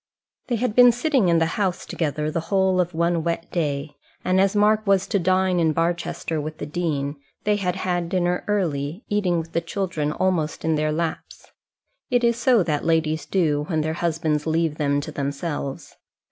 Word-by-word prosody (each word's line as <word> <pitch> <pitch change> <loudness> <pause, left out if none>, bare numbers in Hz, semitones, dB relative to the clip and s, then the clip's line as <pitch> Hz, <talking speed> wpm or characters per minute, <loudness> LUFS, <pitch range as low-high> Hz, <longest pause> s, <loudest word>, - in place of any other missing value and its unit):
They 245 - 0
had 235 -1 -1
been 245 -1 +8
sitting 245 - +1
in 170 - +4
the 165 - +3 0.2
house 185 -3 -1
together 150 -1 -2
the 165 - -1
whole 190 -2 +3
of 175 -1 -3
one 170 0 +1
wet 170 0 -3
day; 145 -3 -2 0.3
and 185 +1 +3
as 195 +1 +2
Mark 210 +1 +3
was 195 -1 +3
to 200 - 0
dine 185 0 +2
in 160 -2 +2
Barchester 165 -1 -1
with 155 +1 -6
the - - -5
dean, 150 -3 -2 0.3
they 210 0 +2
had 180 -3 -1
had 175 -2 -1
dinner 180 -1 0
early, 170 - -1
eating 195 -4 +1
with 165 0 -4
the 170 - 0
children 165 -4 -2
almost 160 -3 -1
in 160 - +2
their 155 0 +1
laps. 160 +1 -4 0.6
It 245 -2 +2
is 235 0 +3
so 235 -3 +3
that 150 -4 -1
ladies 160 -1 0
do, 150 -6 +1
when 160 -3 0
their 155 +1 -1
husbands 160 -2 -1
leave 160 -1 0
them 145 -1 +1
to - - -7
themselves. 140 0 -4
170 Hz, 190 wpm, -23 LUFS, 155-190 Hz, 0.6 s, been